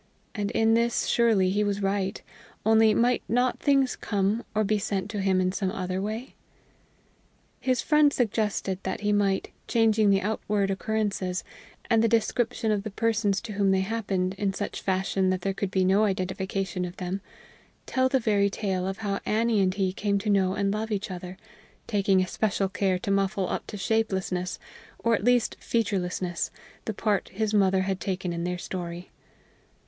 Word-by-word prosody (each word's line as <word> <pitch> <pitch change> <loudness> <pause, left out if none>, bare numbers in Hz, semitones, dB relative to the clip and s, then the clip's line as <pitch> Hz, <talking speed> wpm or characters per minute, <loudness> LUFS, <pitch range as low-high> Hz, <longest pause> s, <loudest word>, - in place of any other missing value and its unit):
And 205 -3 -2
in 225 0 +3
this 235 +1 +2
surely 215 -6 +3
he 205 +2 +1
was 205 -1 -1
right 195 -1 -1 0.5
only 220 0 +5
might 245 +1 +3
not 245 +2 +1
things 275 -2 +2
come, 205 +3 0
or 215 - +3
be 215 +1 +1
sent 195 0 -2
to 205 -3 -2
him 190 -1 +2
in 185 0 +1
some 190 -1 -1
other 185 -2 -3
way? 220 +5 -4 1.3
His 255 -2 0
friend 300 -1 +4
suggested 210 -6 -1
that - - -4
he 210 0 +1
might, 200 -2 +1 0.2
changing 220 -2 +3
the 195 -1 +3
outward 205 -1 0
occurrences, 195 -3 -1 0.4
and 225 -2 +3
the - - +4
description 225 0 +1
of 210 -1 +1
the 215 - -5
persons 215 -2 +1
to 230 - -7
whom 200 -1 +2
they 190 0 +3
happened, 190 -3 -1
in 195 -2 0
such 205 - -4
fashion 190 0 0
that 185 -1 0
there 195 +1 -1
could 195 0 -2
be 190 -1 +1
no 195 +3 +4
identification 190 -1 -2
of 180 +1 -6
them, 185 +2 -3 0.6
tell 260 0 +1
the 265 0 +2
very 205 -4 +2
tale 190 -3 -2
of 195 +1 -3
how 200 -1 -1
Annie 220 -1 +2
and 185 -1 +3
he 190 -2 0
came 200 +1 0
to 205 +1 -1
know 190 -1 +2
and 200 0 0
love 220 +1 -2
each 205 -1 -2
other, 180 0 -7 0.5
taking 195 -3 +2
especial 195 0 -1
care 195 -1 0
to 200 - -3
muffle 195 -1 +1
up - - -3
to 210 - -6
shapelessness, 190 -4 -1 0.4
or 230 - +1
at 200 - +1
least 245 0 +2
featurelessness, 185 -6 -1 0.4
the 220 - -2
part 205 -3 0
his 215 +1 -2
mother 190 -2 +3
had 190 0 -1
taken 185 -2 -2
in 170 0 -3
their 180 0 -2
story. 175 0 -6
200 Hz, 180 wpm, -27 LUFS, 190-220 Hz, 1.3 s, only